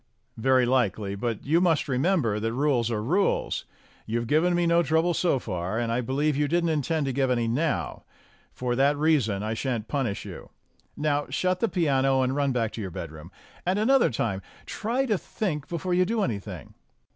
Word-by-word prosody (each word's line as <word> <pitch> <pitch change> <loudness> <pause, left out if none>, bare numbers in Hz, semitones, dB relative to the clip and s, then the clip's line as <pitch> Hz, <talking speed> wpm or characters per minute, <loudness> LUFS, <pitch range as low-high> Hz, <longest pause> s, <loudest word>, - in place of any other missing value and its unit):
"Very 130 +2 +3
likely, 110 -5 0
but 110 +2 -3
you 160 +5 +3
must 165 -5 +3
please - - -13
remember 130 - +1
that 115 +1 -2
rules 130 -3 +1
are 110 -2 -2
rules. 180 - 0 0.4
You've 115 +2 -1
given 160 +7 +2
me 175 0 +2
no 170 0 +4
trouble 160 +2 +2
so 170 -4 +2
far, 95 -3 -3
and 115 -1 -1
I 120 +2 +1
believe 140 +5 0
that 140 - -2
you 145 - +2
didn't 170 +2 +1
intend 155 0 0
to 135 - -1
give 135 0 +1
any 120 -2 +1
now. 145 +7 -1 0.5
For 125 -1 -2
that 140 +3 +3
reason 135 -10 +2
I 110 +1 -2
shan't 115 -2 -2
punish 130 -8 -2
you. - - -9 0.5
Now 145 -1 0
shut 185 0 0
the 230 - +1
piano, 135 -6 +2
and 130 +1 0
run 140 -1 +1
back 115 -3 0
to 115 - -6
your 95 - -4
bedroom. 80 -1 -8 0.3
And 185 +2 0
another 260 +5 +4
time 110 -5 -2 0.2
try 240 +5 -1
to 215 -7 0
think 155 -9 -3
before 180 +1 -2
you 180 +1 +4
do 215 +3 0
anything." 100 - -5
135 Hz, 195 wpm, -26 LUFS, 115-165 Hz, 0.5 s, no